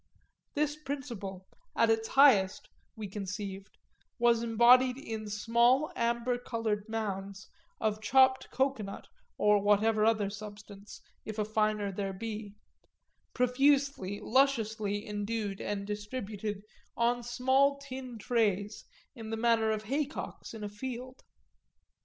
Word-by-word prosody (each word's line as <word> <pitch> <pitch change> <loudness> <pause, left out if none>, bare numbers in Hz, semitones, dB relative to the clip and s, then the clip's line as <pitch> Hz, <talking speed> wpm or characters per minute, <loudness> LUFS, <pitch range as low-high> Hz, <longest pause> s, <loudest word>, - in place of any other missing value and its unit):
This 295 0 0
principle, 240 -11 -6 0.3
at 230 -1 +4
its 225 0 0
highest, 215 -10 +4 0.3
we 215 -2 -6
conceived, 195 0 -6 0.4
was 235 -2 +3
embodied 245 +2 +5
in 220 -5 -6
small 235 +7 +3
amber 235 +1 0
coloured 225 -3 -3
mounds 200 -3 -4 0.3
of 215 0 -1
chopped 260 +4 +4
cocoanut 260 -7 -2 0.3
or 210 -1 +4
whatever 210 +2 +3
other 215 -3 +2
substance, 205 -1 -10 0.2
if 215 0 -7
a 210 - 0
finer 215 -1 0
there 195 0 -3
be; 210 0 -6 0.8
profusely, 260 -5 +2
lusciously 220 -5 +1
endued 205 -1 -3
and 200 -1 -3
distributed 210 -1 -5 0.3
on 240 +1 +2
small 260 +4 +2
tin 260 -3 -8
trays 210 -2 0 0.3
in 225 -4 -8
the 225 - -3
manner 225 -1 +2
of 215 -1 -1
haycocks 280 0 -4
in 215 - -7
a - - -2
field. 255 +4 -7
220 Hz, 115 wpm, -31 LUFS, 205-250 Hz, 0.8 s, embodied